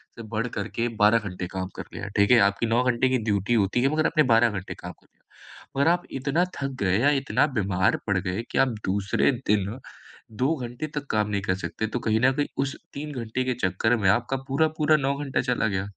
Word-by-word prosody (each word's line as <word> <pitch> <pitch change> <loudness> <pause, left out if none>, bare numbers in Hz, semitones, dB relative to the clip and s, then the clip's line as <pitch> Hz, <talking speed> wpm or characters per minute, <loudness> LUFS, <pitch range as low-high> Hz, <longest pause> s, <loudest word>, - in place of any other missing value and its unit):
से 115 - -8
बढ़कर 110 -1 -3
के 120 +1 0
12 105 +2 +6
घंटे 90 0 -5
काम 95 0 -4
कर - - -5
लिया, 100 - -6
ठीक 100 +2 +4
है। 125 - +7
आपकी 100 +3 -1
9 115 +2 +2
घंटे 125 0 +2
की 130 - +2
ड्यूटी 105 +1 0
होती 110 +1 +2
है, 135 - +3
मगर 155 +1 +1
आपने 155 -2 +3
12 115 +1 +5
घंटे 95 -3 -5
काम - - -8
कर - - -28
लिया। 135 - -13
मगर 140 +4 +4
आप 175 0 0 0.2
इतना 145 +7 +1
थक 135 -1 -3
गए 95 -1 +2
या 140 +5 +4
इतना 135 - +2
बीमार 95 -2 +1
पड़ 100 -2 +2
गए 95 +4 -3
कि - - -2
आप 135 0 +4 0.2
दूसरे 100 +6 +1 0.2
दिन 105 +3 0 0.6
2 145 +6 +2
घंटे 125 +2 -5
तक 145 -1 -3
काम 105 -1 +1
नहीं 100 -1 -1
कर 95 -1 0
सकते, 110 +3 -4
तो 120 - -3
कहीं 110 -2 +1
न 130 +1 +5
कहीं 145 +2 -1 0.2
उस 140 0 -4 0.2
3 150 +2 -6
घंटे 115 +3 -2
के 130 0 0
चक्कर 110 +6 +1
में 100 -4 +2
आपका 120 +6 +1
पूरा-पूरा 155 +2 +2
9 140 -1 0
घंटा 135 -2 0
चला 125 -3 0
गया। 95 -2 -1
115 Hz, 230 wpm, -25 LUFS, 100-135 Hz, 0.6 s, है